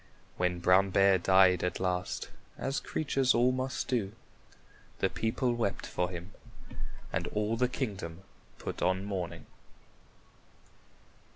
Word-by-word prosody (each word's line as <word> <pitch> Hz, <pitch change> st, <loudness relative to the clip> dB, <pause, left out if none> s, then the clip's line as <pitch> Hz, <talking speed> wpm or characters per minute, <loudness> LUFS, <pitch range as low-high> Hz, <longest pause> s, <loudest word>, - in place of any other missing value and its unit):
When 90 Hz, 0 st, 0 dB
Brown 95 Hz, +2 st, +5 dB
Bear 95 Hz, 0 st, +5 dB
died 95 Hz, -1 st, +5 dB
at 90 Hz, -, -1 dB
last, 90 Hz, -1 st, -2 dB, 0.3 s
as 135 Hz, +1 st, -1 dB
creatures 135 Hz, -4 st, +1 dB
all 120 Hz, +2 st, +4 dB
must 130 Hz, 0 st, -2 dB
do, 110 Hz, -6 st, 0 dB, 0.8 s
the -, -, +1 dB
people 120 Hz, +2 st, 0 dB
wept 115 Hz, -4 st, -1 dB
for 90 Hz, 0 st, -1 dB
him, 90 Hz, +1 st, -7 dB, 0.8 s
and -, -, -1 dB
all 105 Hz, +1 st, 0 dB
the 125 Hz, +2 st, +2 dB
kingdom 95 Hz, -, -4 dB, 0.3 s
put -, -, -6 dB
on 95 Hz, +2 st, +1 dB
mourning. 95 Hz, -4 st, -4 dB
95 Hz, 120 wpm, -31 LUFS, 90-120 Hz, 0.8 s, Brown